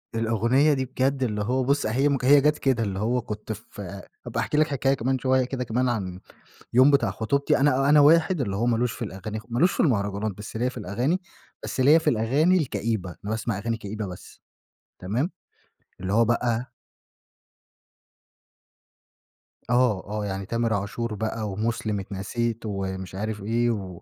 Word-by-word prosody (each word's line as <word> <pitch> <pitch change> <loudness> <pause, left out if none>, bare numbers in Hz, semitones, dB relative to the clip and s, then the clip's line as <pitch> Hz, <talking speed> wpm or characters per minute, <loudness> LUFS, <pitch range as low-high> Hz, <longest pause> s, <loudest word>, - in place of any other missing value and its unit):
الأغنية 115 +6 +3
دي 130 -2 -1
بجد 130 +1 0
اللي 105 -4 -1
هو 130 +4 0
بُص 140 +3 +1
هي 130 +7 +2
م 140 - +2
هي 140 +2 +7
جات 150 +1 +3
كده 130 -4 +1
اللي 95 -3 -3
هو 120 +4 0
كنت 105 -1 -6
ف 105 - -14
هابقى 100 0 -7
أحكِي 150 - -1
لك 155 0 +4
حكاية 135 -1 +1
كمان 130 +1 -1
شويّة 130 0 +2
كده 125 0 -3
كمان 125 +2 0
عن 95 -6 -3 0.6
اليوم 130 +3 +7
بتاع 130 -7 +3
خطوبتي، 130 +8 +1
أنا 135 -1 +3
أنا 150 0 +7
واحد 160 +3 +5
اللي 100 -7 -1
هو 115 +4 0
مالوش 120 0 +1
في - - -7
الأغاني 105 +2 -6
خ - - -22
مالوش 140 +10 +2
في - - -3
المهرجانات، 100 - +1
بس 105 +1 -8
ليَّ 125 +3 0
في - - -15
الأغاني 120 - -1 0.4
بس - - -3
ليَّ 145 +5 +6
في 160 - +1
الأغاني 140 +11 +3
الكئيبة، 115 - -2
أنا 105 - -4
باسمع 110 -2 -2
أغاني 115 +2 -2
كئيبة 105 -1 -5
بس. 90 -1 -11 0.6
تمام، 115 - -1 0.7
اللي 95 +1 -2
هو 115 +2 +4
بقى 120 +1 0 3.0
آه، 120 -6 +2
آه 105 0 -3
يعني 95 -1 -4
تامر 115 +1 0
عاشور 110 +3 -3
بقى، 110 0 -3
ومُسلم 110 0 -2
اتنسيت 110 +4 -3
ومش 95 -2 -4
عارف 105 +1 -4
إيه، 120 +3 +1
و 95 -6 -5
115 Hz, 170 wpm, -25 LUFS, 105-130 Hz, 3.0 s, هي